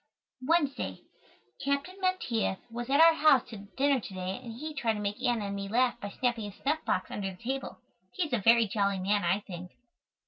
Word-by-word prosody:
Wednesday. 290 0 0 0.6
Captain 280 +6 -1
Menteith 255 - 0
was 240 +2 -5
at 280 +2 +3
our 330 0 +8
house 300 -5 +4
to 225 - -7 0.2
dinner 280 0 +3
to 205 - -9
day 185 +3 -3
and 230 -2 -7
he 305 +7 -6
tried 240 -6 0
to 210 - -4
make 205 +3 -3
Anna 240 -5 +1
and 200 0 -3
me 200 0 -4
laugh 245 +3 +2
by 205 - -4
snapping 230 -1 -1
his 200 - -15
snuff 305 +3 0
box 185 - -1
under 195 -2 -3
the 185 - -10
table. 265 +3 -3 0.3
He 365 - -1
is 295 - -7
a 240 - +3
very 230 +2 +5
jolly 200 -1 0
man, 205 +2 +1
I 180 +4 +1
think. 180 -3 -9
235 Hz, 210 wpm, -30 LUFS, 200-280 Hz, 0.6 s, our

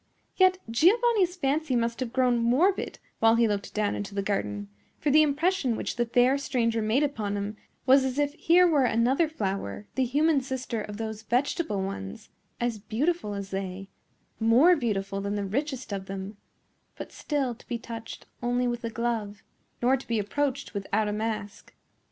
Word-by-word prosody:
Yet 370 -1 +5
Giovanni's 375 - +3
fancy 295 -3 0
must 235 0 0
have 255 -3 -3
grown 250 -2 +2
morbid 275 +12 +2 0.2
while 225 0 +5
he 230 0 +4
looked 205 -1 -2
down 210 -1 +1
into 205 0 -5
the 200 - -1
garden; 105 - -2 0.3
for 295 - 0
the 305 +2 +7
impression 305 -2 +1
which - - -3
the 240 -1 0
fair 250 +4 +3
stranger 230 -5 0
made 220 +7 +2
upon 215 -8 -2
him 200 +1 -4 0.3
was 265 +1 +6
as 265 0 -2
if 290 0 +1
here 345 +3 +4
were 295 -6 +3
another 250 +8 +2
flower, 195 - -3
the 265 - +1
human 290 +3 +2
sister 255 -3 -4
of 210 0 -7
those 220 -1 -5
vegetable 240 - 0
ones, 95 - -6 0.3
as 235 -2 -1
beautiful 230 - -1
as 200 -1 -6
they, 195 0 -5 0.5
more 245 +11 +6
beautiful 200 -7 -2
than 200 +1 -2
the 205 -1 -2
richest 260 +2 -3
of 195 -1 -5
them, 195 +2 -6 0.6
but - - -7
still 280 -5 -2
to 235 - -18
be 240 - -2
touched 230 -1 -8 0.2
only 245 +1 +1
with 240 0 -3
a 230 - -2
glove, 225 -3 -3 0.4
nor 255 +2 +5
to 265 - -12
be 230 - 0
approached 275 +6 -2
without 205 +1 -1
a - - -2
mask. 210 -2 -4
235 Hz, 175 wpm, -27 LUFS, 210-280 Hz, 0.6 s, the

